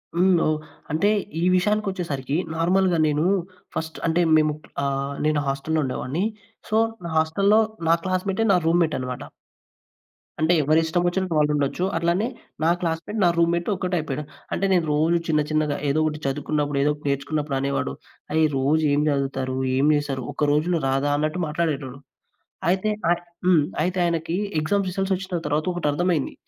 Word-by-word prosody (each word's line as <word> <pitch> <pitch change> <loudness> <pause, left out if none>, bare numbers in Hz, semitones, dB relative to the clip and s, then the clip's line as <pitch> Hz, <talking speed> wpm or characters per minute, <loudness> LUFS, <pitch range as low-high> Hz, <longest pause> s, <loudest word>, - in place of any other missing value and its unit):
హ్మ్. 185 +2 +4
ఓహ్! 155 0 +1 0.3
అంటే 160 +7 +2 0.3
ఈ - - 0
విషయానికొచ్చేసరికి 180 -8 -1 0.2
నార్మల్‌గా 180 +2 +2
నేను 150 +2 +1 0.5
ఫస్ట్ 160 0 -4
అంటే 165 +2 +2 0.2
మేము 155 -1 +2 0.3
ఆహ్, 140 0 -1
నేను 155 -1 +2
హాస్టల్‌లో 140 +4 0
ఉండేవాడిని. 135 +7 -2 0.4
సో 215 - +2 0.3
నా 170 - -4
హాస్టల్‌లో, 195 +7 +3 0.3
నా - - +7
క్లాస్‌మేటే 190 +3 0
నా - - +5
రూమ్‌మేట్ 165 -2 +2
అన్నమాట. 125 -1 -5 1.2
అంటే 160 +3 +3
ఎవరిష్టంవొచినట్టు 175 +4 +1
వాళ్ళుండొచ్చు. 150 +2 +1
అట్లానే 170 +6 +1 0.4
నా 160 - +4
క్లాస్‌మేట్ 170 +5 -2
నా 175 - +5
రూమ్‌మేట్ 170 0 +2
ఒకటైపోయాడు. 165 -6 -2 0.3
అంటే 195 - 0
నేను 175 -3 +2
రోజు 160 +3 +3
చిన్న 155 -2 +2
చిన్నగా 155 -2 +1
ఏదో 145 +3 +2
ఒకటి 155 -1 -1
చదువుకున్నప్పుడు 145 +1 -1
ఏదో 150 - +3
ఒకటి 150 0 -8
నేర్చుకున్నప్పుడు 140 +1 -1
అనేవాడు. 135 - -1 0.4
"అయ్! 160 0 +4
రోజు 145 +4 +2
ఏం 145 - +2
చదువుతారు? 135 -2 -1 0.2
ఏం 135 - +3
చేస్తారు? 140 -3 -2
ఒక్క 150 -1 0
రోజులో 165 +3 +1
రాదా" 135 +2 +1
అన్నట్టు 155 +4 -1
మాట్లాడేటోడు. 150 -4 -2 0.7
అయితే 190 +3 +1 0.2
అయి 175 - +2 0.2
హ్మ్. 180 -4 +5 0.2
అయితే 180 +3 -1
ఆయనకి 165 -1 -1 0.2
ఎగ్జామ్స్ 195 +5 0
రిజల్ట్స్ 195 +1 0
ఒచ్చిన 185 -1 -4
తర్వాత 150 +1 0
ఒకటర్థమైంది. 165 -1 0
160 Hz, 145 wpm, -24 LUFS, 145-175 Hz, 1.2 s, నా